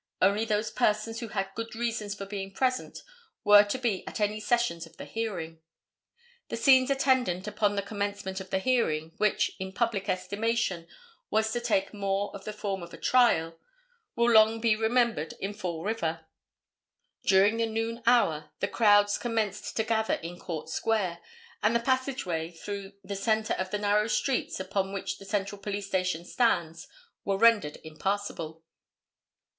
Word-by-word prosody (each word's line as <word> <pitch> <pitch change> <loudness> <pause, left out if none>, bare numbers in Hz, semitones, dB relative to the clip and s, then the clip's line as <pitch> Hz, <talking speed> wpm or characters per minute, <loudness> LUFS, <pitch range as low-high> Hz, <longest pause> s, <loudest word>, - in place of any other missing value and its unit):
Only 200 +4 +3
those 215 -1 0
persons 225 -1 0
who 235 - -5
had 195 -2 -3
good 230 +1 -6
reasons 225 -3 -2
for 200 - -6
being 195 -1 -5
present 255 +5 -1 0.4
were 205 0 +8
to 205 +5 -2
be 235 -7 -1
at - - -5
any 210 0 0
sessions 215 -6 0
of - - -21
the - - -7
hearing. 175 -8 -4 0.9
The - - -3
scenes 260 -1 +5
attendant 260 -9 +1
upon 210 -1 +1
the 200 - -1
commencement 200 -2 -3
of 190 - -10
the 190 - +1
hearing, 190 -9 +1
which, 210 -1 +2
in 190 0 -4
public 215 -3 -1
estimation 190 -1 -1 0.4
was 220 0 +1
to 240 +1 -1
take 215 -5 0
more 200 0 -1
of 195 - -10
the 215 - -3
form 200 -2 -4
of 170 0 -9
a - - -12
trial, 165 -10 +3 0.6
will 235 0 +3
long 220 0 +6
be 225 -1 +3
remembered 225 -7 +1
in 195 +2 -3
Fall 175 -6 -4
River. 165 -7 -2 1.0
During 200 +3 +4
the 230 0 +1
noon 225 +1 -3
hour 155 -11 +3
the - - 0
crowds 205 -2 +4
commenced 215 -3 -2
to 220 - +2
gather 220 0 +1
in 175 +2 -8
Court 160 -4 -5
Square, 185 0 -1 0.4
and 215 +2 +2
the - - +4
passageway 255 -10 -1
through 195 +3 -7
the 200 +1 -5
centre 215 +2 +1
of 185 0 -3
the 210 - -1
narrow 210 +1 +2
streets 255 -1 0
upon 195 +1 -2
which 195 - -4
the 195 - -11
Central 200 0 -2
Police 205 0 -3
Station 185 -3 -1
stands 170 -9 0 0.4
was 195 0 -1
rendered 220 -10 +4
impassable. 165 -1 -4
205 Hz, 165 wpm, -28 LUFS, 190-225 Hz, 1.0 s, were